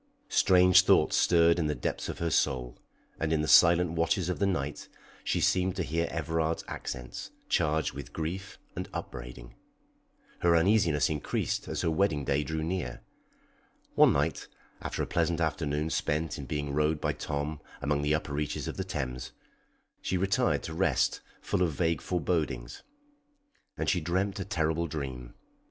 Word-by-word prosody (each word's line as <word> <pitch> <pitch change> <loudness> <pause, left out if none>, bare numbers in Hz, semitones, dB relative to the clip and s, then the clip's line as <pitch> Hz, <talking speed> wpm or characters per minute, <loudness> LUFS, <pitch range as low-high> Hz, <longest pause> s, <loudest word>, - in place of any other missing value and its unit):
Strange 90 -1 +6
thoughts 90 - +4
stirred 85 0 +4
in 80 - +1
the 75 - -1
depths - - -3
of - - -4
her 85 -1 -1
soul, 60 -4 0 0.4
and 80 -1 -1
in 80 -1 +2
the 75 - -1
silent 85 0 +6
watches 85 +3 0
of 90 - -2
the 100 - +2
night 75 -6 -2 0.4
she - - 0
seemed 95 0 +2
to 95 - -1
hear 85 +1 -1
Everard's 80 0 -1
accents, 60 -1 -6 0.2
charged 75 +1 +1
with 70 -1 -8
grief 85 +4 -5 0.2
and - - -5
upbraiding. - - -7 0.9
Her 85 -1 +4
uneasiness 85 -5 +3
increased 75 -2 -2
as - - -2
her 80 - +1
wedding 80 -5 +1
day 70 +3 +1
drew 80 +1 -3
near. 85 -7 -3 0.9
One - - +6
night, - - -1 0.3
after - - -3
a - - -1
pleasant 85 0 0
afternoon 80 -1 -1
spent 80 +2 -1
in 70 - -7
being 75 +1 -3
rowed 75 +1 +1
by - - 0
Tom 75 0 -4 0.2
among 70 0 0
the 75 +1 +2
upper 75 -2 -4
reaches 75 0 -2
of - - -5
the - - -1
Thames, 65 0 -4 0.7
she 95 - -1
retired 95 +2 +1
to 80 - -5
rest 80 -6 +1 0.2
full - - -1
of 85 -4 +2
vague 80 +1 0
forebodings. 75 -8 -2 1.0
And - - -2
she 90 - +2
dreamt 95 +5 -1
a 95 - -3
terrible 85 -3 0
dream. 65 -5 -6
80 Hz, 165 wpm, -29 LUFS, 75-85 Hz, 1.0 s, Strange